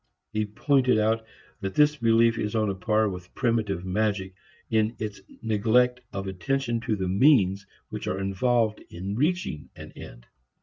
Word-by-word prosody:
He 110 Hz, -1 st, 0 dB
pointed 130 Hz, +3 st, +2 dB
out 110 Hz, +1 st, +1 dB, 0.4 s
that 95 Hz, -2 st, -4 dB
this 150 Hz, 0 st, +4 dB
belief 115 Hz, -1 st, +3 dB
is 105 Hz, +1 st, -2 dB
on 110 Hz, -2 st, +1 dB
a -, -, -2 dB
par 110 Hz, +3 st, +1 dB
with 90 Hz, -2 st, -7 dB
primitive 105 Hz, -7 st, 0 dB
magic 95 Hz, -1 st, -1 dB, 0.4 s
in 110 Hz, +1 st, +2 dB
its 105 Hz, -2 st, -5 dB, 0.2 s
neglect 115 Hz, +3 st, +2 dB
of 95 Hz, 0 st, -4 dB
attention 120 Hz, +6 st, -1 dB
to 115 Hz, -1 st, -1 dB
the 95 Hz, -2 st, -2 dB
means 100 Hz, -3 st, +3 dB, 0.2 s
which -, -, -6 dB
are 95 Hz, +1 st, -1 dB
involved 110 Hz, +3 st, +1 dB
in 95 Hz, +4 st, -5 dB
reaching 150 Hz, -, -1 dB
an -, -, -10 dB
end. -, -, -12 dB
110 Hz, 160 wpm, -26 LUFS, 95-115 Hz, 0.4 s, this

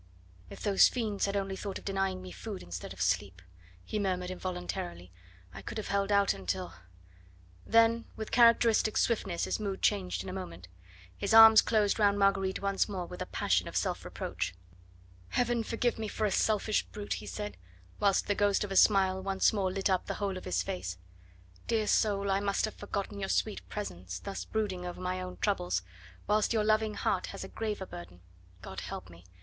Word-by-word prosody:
"If -, -, -10 dB
those 200 Hz, -2 st, +6 dB
friends 215 Hz, -5 st, -1 dB
had 200 Hz, 0 st, -1 dB
only 195 Hz, -1 st, -2 dB
thought 195 Hz, 0 st, -5 dB
of -, -, -13 dB
denying 195 Hz, -1 st, -1 dB
me 185 Hz, -, -8 dB
food 210 Hz, -4 st, -7 dB
instead 85 Hz, +1 st, -7 dB
of 95 Hz, -, -10 dB
sleep," 95 Hz, 0 st, 0 dB, 0.5 s
he 215 Hz, -, -2 dB
murmured 185 Hz, -2 st, -1 dB
involuntarily, 175 Hz, -, -5 dB, 0.4 s
"I 95 Hz, -, -8 dB
could 160 Hz, -, -6 dB
have 215 Hz, -, -4 dB
held 200 Hz, 0 st, 0 dB
out 200 Hz, -1 st, +4 dB
until 90 Hz, -1 st, -4 dB, 0.5 s
" 90 Hz, 0 st, -27 dB
Then 230 Hz, +1 st, +4 dB
with 220 Hz, -, -6 dB
characteristic 230 Hz, -2 st, +5 dB
swiftness 195 Hz, -7 st, 0 dB
his -, -, -1 dB
mood 200 Hz, -3 st, -4 dB
changed 195 Hz, -3 st, +1 dB
in 190 Hz, -, -7 dB
a -, -, -5 dB
moment. 95 Hz, -, -7 dB, 0.5 s
His 200 Hz, +2 st, 0 dB
arms 225 Hz, 0 st, +10 dB
closed 215 Hz, -1 st, +1 dB
round 205 Hz, -1 st, +4 dB
Marguerite 195 Hz, -1 st, +1 dB
once 195 Hz, +1 st, +1 dB
more 185 Hz, -3 st, -3 dB
with -, -, -9 dB
a -, -, -3 dB
passion -, -, +1 dB
of -, -, -8 dB
self -, -, -1 dB
reproach. 90 Hz, +1 st, -4 dB, 0.7 s
"Heaven 240 Hz, -1 st, +1 dB
forgive 230 Hz, +1 st, -1 dB
me 220 Hz, -, -2 dB
for 215 Hz, +1 st, -2 dB
a 205 Hz, -, +1 dB
selfish 215 Hz, +1 st, +2 dB
brute," 205 Hz, -1 st, -4 dB
he 105 Hz, -, -10 dB
said, 105 Hz, +1 st, -5 dB, 0.4 s
whilst 200 Hz, -2 st, +3 dB
the 205 Hz, -, +1 dB
ghost 205 Hz, 0 st, +2 dB
of 205 Hz, -, -5 dB
a -, -, -2 dB
smile 190 Hz, -2 st, +4 dB
once 195 Hz, +1 st, +2 dB
more 195 Hz, -3 st, 0 dB
lit 195 Hz, 0 st, 0 dB
up 185 Hz, -2 st, 0 dB
the -, -, -2 dB
whole 200 Hz, -2 st, -2 dB
of 185 Hz, -, -7 dB
his 90 Hz, 0 st, 0 dB
face. 90 Hz, 0 st, -4 dB, 0.7 s
"Dear 225 Hz, -2 st, +1 dB
soul, 200 Hz, -2 st, +2 dB
I 195 Hz, -, +2 dB
must 200 Hz, +1 st, 0 dB
have 215 Hz, -, -6 dB
forgotten 200 Hz, 0 st, -5 dB
your 195 Hz, -1 st, -3 dB
sweet 215 Hz, -, 0 dB
presence, 90 Hz, -, -5 dB
thus 200 Hz, -1 st, -6 dB
brooding 205 Hz, -5 st, -2 dB
over 180 Hz, 0 st, -6 dB
my 185 Hz, 0 st, -2 dB
own 185 Hz, 0 st, -7 dB
troubles, 90 Hz, -, 0 dB, 0.4 s
whilst 210 Hz, +2 st, +2 dB
your 220 Hz, -2 st, +2 dB
loving 215 Hz, 0 st, +2 dB
heart -, -, 0 dB
has -, -, -7 dB
a -, -, -6 dB
graver 210 Hz, -3 st, -4 dB
burden 90 Hz, -, -10 dB, 0.4 s
God 95 Hz, -, -6 dB
help 90 Hz, -, -7 dB
me! 85 Hz, 0 st, -15 dB
195 Hz, 195 wpm, -31 LUFS, 175-210 Hz, 0.7 s, arms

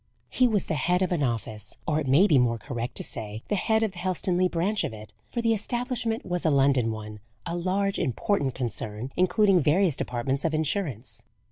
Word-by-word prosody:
He 255 Hz, -, +4 dB
was 210 Hz, -5 st, 0 dB
the -, -, -2 dB
head 180 Hz, +6 st, +1 dB
of 185 Hz, -, -1 dB
an 170 Hz, -4 st, 0 dB
office 110 Hz, -4 st, -2 dB
or 155 Hz, -1 st, +1 dB
it 145 Hz, -, -3 dB
may 145 Hz, +9 st, +5 dB
be 150 Hz, -10 st, +4 dB
more 120 Hz, -1 st, +2 dB
correct 120 Hz, +1 st, -5 dB
to -, -, -2 dB
say 110 Hz, +1 st, -6 dB
the 210 Hz, -, +1 dB
head 220 Hz, +3 st, +1 dB
of 220 Hz, -, 0 dB
the 180 Hz, -, -10 dB
Helstonleigh 185 Hz, 0 st, 0 dB
branch 190 Hz, +6 st, 0 dB
of -, -, -3 dB
it, 110 Hz, 0 st, -11 dB, 0.2 s
for 235 Hz, -, -3 dB
the 230 Hz, -1 st, +3 dB
establishment 235 Hz, +1 st, -1 dB
was 180 Hz, -1 st, -2 dB
a 160 Hz, -, +3 dB
London 135 Hz, -4 st, +3 dB
one 105 Hz, -1 st, -7 dB, 0.3 s
a 170 Hz, 0 st, -3 dB
large, 190 Hz, +3 st, 0 dB
important 135 Hz, -, 0 dB
concern, 115 Hz, -1 st, -4 dB
including 190 Hz, +1 st, +4 dB
various 165 Hz, +1 st, +3 dB
departments 130 Hz, +3 st, -2 dB
of 160 Hz, -1 st, 0 dB
Insurance. 150 Hz, -, -2 dB
160 Hz, 205 wpm, -26 LUFS, 125-195 Hz, 0.3 s, may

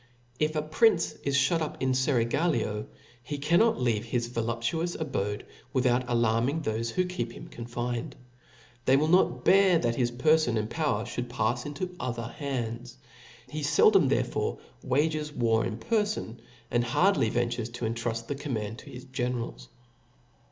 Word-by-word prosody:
If 155 Hz, +1 st, +1 dB
a 150 Hz, -, 0 dB
prince 170 Hz, +3 st, +3 dB
is 140 Hz, -1 st, +3 dB
(hut 165 Hz, 0 st, +1 dB
up 155 Hz, -, -4 dB
in 130 Hz, -, 0 dB
a -, -, +2 dB
feraglio, 120 Hz, -3 st, +1 dB, 0.3 s
he 145 Hz, +4 st, -5 dB
cannot 170 Hz, -, +3 dB
leave 115 Hz, -4 st, +1 dB
his 120 Hz, 0 st, -1 dB
voluptuous 120 Hz, +8 st, -2 dB
abode 105 Hz, -9 st, -3 dB, 0.3 s
without 125 Hz, -1 st, +2 dB
alarming 120 Hz, +6 st, +1 dB
thofe 115 Hz, -1 st, -1 dB
who 185 Hz, +10 st, 0 dB
keep 180 Hz, -10 st, -3 dB
him -, -, -10 dB
confined. 120 Hz, 0 st, -4 dB, 0.7 s
They 130 Hz, +1 st, +5 dB
will 150 Hz, +2 st, +2 dB
not 125 Hz, -8 st, +3 dB
bear 190 Hz, -2 st, +6 dB
that 120 Hz, -5 st, 0 dB
his 120 Hz, -2 st, +2 dB
perfon 140 Hz, -1 st, +3 dB
and 110 Hz, +1 st, -2 dB
power 145 Hz, -8 st, 0 dB
(hould 120 Hz, 0 st, -4 dB
p^fs 120 Hz, +4 st, -1 dB
into 180 Hz, +5 st, -5 dB
other 120 Hz, -2 st, -3 dB
hands. 125 Hz, -2 st, -4 dB, 0.5 s
I -, -, -20 dB
He 155 Hz, 0 st, -4 dB
feldom 150 Hz, +3 st, +5 dB
therefore -, -, 0 dB, 0.3 s
wages 150 Hz, +3 st, 0 dB
war 115 Hz, -5 st, +2 dB
in 110 Hz, -, -3 dB
perfon, 210 Hz, -, -1 dB, 0.3 s
and 120 Hz, 0 st, +2 dB
hardly 150 Hz, -, +3 dB
ventures 120 Hz, 0 st, -1 dB
to 120 Hz, 0 st, -5 dB
intruft 115 Hz, 0 st, -2 dB
the 145 Hz, -, -3 dB
command 115 Hz, -7 st, -4 dB
to -, -, -12 dB
his 125 Hz, +1 st, -9 dB
generals. 120 Hz, -, -4 dB
125 Hz, 160 wpm, -28 LUFS, 115-155 Hz, 0.7 s, bear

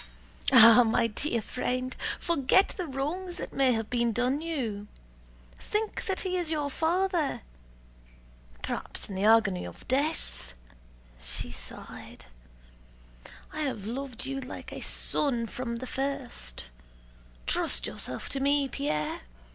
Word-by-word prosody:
"Ah, 230 Hz, -2 st, +10 dB
my 230 Hz, 0 st, +2 dB
dear 230 Hz, +1 st, -1 dB
friend! 255 Hz, +2 st, -2 dB, 0.2 s
Forget 340 Hz, +3 st, +3 dB
the 365 Hz, -3 st, -5 dB
wrongs 335 Hz, +7 st, -3 dB
that -, -, -6 dB
may 265 Hz, -2 st, +4 dB
have 225 Hz, -1 st, -1 dB
been 235 Hz, -2 st, +2 dB
done 250 Hz, +5 st, +1 dB
you. 235 Hz, -11 st, -3 dB, 0.7 s
Think 425 Hz, 0 st, -2 dB
that 385 Hz, -3 st, -1 dB
he 370 Hz, -1 st, -1 dB
is 345 Hz, -3 st, -1 dB
your 295 Hz, -3 st, 0 dB
father... 345 Hz, 0 st, +1 dB, 1.2 s
perhaps -, -, -4 dB
in -, -, -5 dB
the 190 Hz, +2 st, 0 dB
agony 220 Hz, -4 st, +5 dB
of -, -, -10 dB
death." 270 Hz, -, -1 dB, 0.7 s
She 65 Hz, +1 st, -5 dB
sighed. -, -, -10 dB, 1.3 s
"I 310 Hz, -, -5 dB
have 250 Hz, -9 st, -2 dB
loved 250 Hz, +1 st, -4 dB
you 270 Hz, 0 st, -3 dB
like 255 Hz, -, -8 dB
a -, -, -6 dB
son 245 Hz, -6 st, +2 dB
from 235 Hz, +1 st, -4 dB
the 245 Hz, +2 st, -5 dB
first. 255 Hz, -, -4 dB, 0.7 s
Trust -, -, +2 dB
yourself 125 Hz, -, -3 dB
to 275 Hz, -, -1 dB
me, 280 Hz, 0 st, +3 dB
Pierre. 150 Hz, -, -2 dB
260 Hz, 130 wpm, -29 LUFS, 225-300 Hz, 1.3 s, Ah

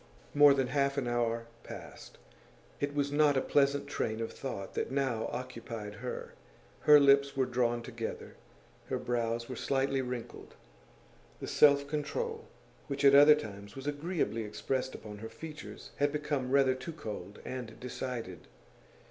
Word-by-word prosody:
More 145 Hz, -1 st, +7 dB
than 135 Hz, -1 st, +1 dB
half 140 Hz, +1 st, +1 dB
an 130 Hz, -3 st, 0 dB
hour 115 Hz, -1 st, 0 dB, 0.2 s
passed. -, -, -10 dB, 0.6 s
It 145 Hz, 0 st, -2 dB
was 140 Hz, -1 st, 0 dB
not 145 Hz, -1 st, +4 dB
a -, -, +5 dB
pleasant 140 Hz, 0 st, +2 dB
train 110 Hz, 0 st, -2 dB
of 115 Hz, -, -3 dB
thought 110 Hz, -8 st, -6 dB
that -, -, -2 dB
now 130 Hz, -4 st, -1 dB
occupied 115 Hz, -4 st, -6 dB
her. 125 Hz, -, -5 dB, 0.5 s
Her 150 Hz, -1 st, +8 dB
lips 140 Hz, 0 st, +4 dB
were 130 Hz, -, +3 dB
drawn 120 Hz, -1 st, 0 dB
together, 115 Hz, -2 st, -6 dB, 0.5 s
her -, -, -1 dB
brows 115 Hz, -1 st, -1 dB
were 130 Hz, -, -5 dB
slightly 135 Hz, +1 st, 0 dB
wrinkled; 125 Hz, -2 st, -6 dB, 0.8 s
the -, -, -5 dB
self 140 Hz, -1 st, +5 dB
control 445 Hz, -, -3 dB, 0.4 s
which 140 Hz, 0 st, -1 dB
at 140 Hz, -, +8 dB
other 145 Hz, +2 st, +9 dB
times 100 Hz, -8 st, -8 dB
was 135 Hz, 0 st, -8 dB
agreeably 145 Hz, -5 st, -1 dB
expressed 130 Hz, +5 st, -3 dB
upon 105 Hz, -1 st, -9 dB
her 110 Hz, +1 st, -7 dB
features 155 Hz, -2 st, -9 dB
had 145 Hz, 0 st, +2 dB
become 145 Hz, -3 st, -2 dB
rather 135 Hz, -1 st, +4 dB
too 130 Hz, +6 st, -7 dB
cold 105 Hz, -, -7 dB
and 125 Hz, -4 st, -6 dB
decided. 120 Hz, -, -5 dB
130 Hz, 150 wpm, -31 LUFS, 115-145 Hz, 0.8 s, other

